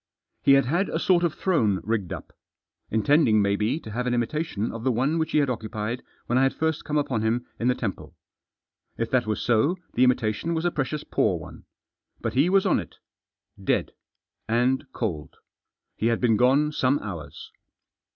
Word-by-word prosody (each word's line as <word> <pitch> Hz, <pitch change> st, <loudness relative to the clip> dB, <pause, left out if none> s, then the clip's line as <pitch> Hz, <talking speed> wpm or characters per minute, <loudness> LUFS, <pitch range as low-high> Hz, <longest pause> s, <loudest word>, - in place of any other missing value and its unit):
He 140 Hz, -, +5 dB
had 135 Hz, -1 st, +5 dB
had 175 Hz, +10 st, 0 dB
a -, -, -1 dB
sort 175 Hz, -2 st, +3 dB
of 170 Hz, -3 st, 0 dB
throne 115 Hz, -, +1 dB
rigged 105 Hz, -5 st, -2 dB
up. -, -, -7 dB, 0.6 s
Intending, 110 Hz, +1 st, +3 dB
maybe, 105 Hz, +7 st, +1 dB
to 110 Hz, -, -9 dB
have 125 Hz, +3 st, -2 dB
an 120 Hz, -, +1 dB
imitation 120 Hz, -2 st, -2 dB
of 115 Hz, 0 st, -7 dB
the 130 Hz, -, +2 dB
one 135 Hz, +8 st, +1 dB
which 160 Hz, -, -1 dB
he -, -, +3 dB
had 145 Hz, -2 st, +3 dB
occupied 110 Hz, -1 st, -3 dB, 0.2 s
when 125 Hz, +2 st, +1 dB
I -, -, +3 dB
had 135 Hz, 0 st, +2 dB
first 160 Hz, 0 st, -1 dB
come 150 Hz, -1 st, -1 dB
upon 130 Hz, -6 st, 0 dB
him 115 Hz, +3 st, 0 dB
in 115 Hz, -, 0 dB
the 125 Hz, -, +3 dB
temple. 105 Hz, -7 st, -5 dB, 0.8 s
If 115 Hz, -, -2 dB
that 125 Hz, -4 st, +2 dB
was 110 Hz, -, -1 dB
so 125 Hz, +10 st, +2 dB, 0.2 s
the 125 Hz, -, +3 dB
imitation 125 Hz, +5 st, +1 dB
was 160 Hz, +1 st, -2 dB
a 175 Hz, -, +2 dB
precious 145 Hz, 0 st, -2 dB
poor -, -, +1 dB
one. -, -, -11 dB, 0.5 s
But -, -, -3 dB
he 140 Hz, +7 st, +3 dB
was 195 Hz, 0 st, +3 dB
on -, -, +3 dB
it. -, -, -8 dB, 0.7 s
Dead. -, -, 0 dB, 0.6 s
And 130 Hz, +4 st, +1 dB
cold. 85 Hz, -14 st, -4 dB, 0.6 s
He 110 Hz, -, 0 dB
had 115 Hz, -1 st, +1 dB
been 115 Hz, -3 st, +3 dB
gone 135 Hz, +6 st, +3 dB
some 135 Hz, -1 st, +2 dB
hours. 80 Hz, -, -8 dB
125 Hz, 190 wpm, -25 LUFS, 110-150 Hz, 0.8 s, He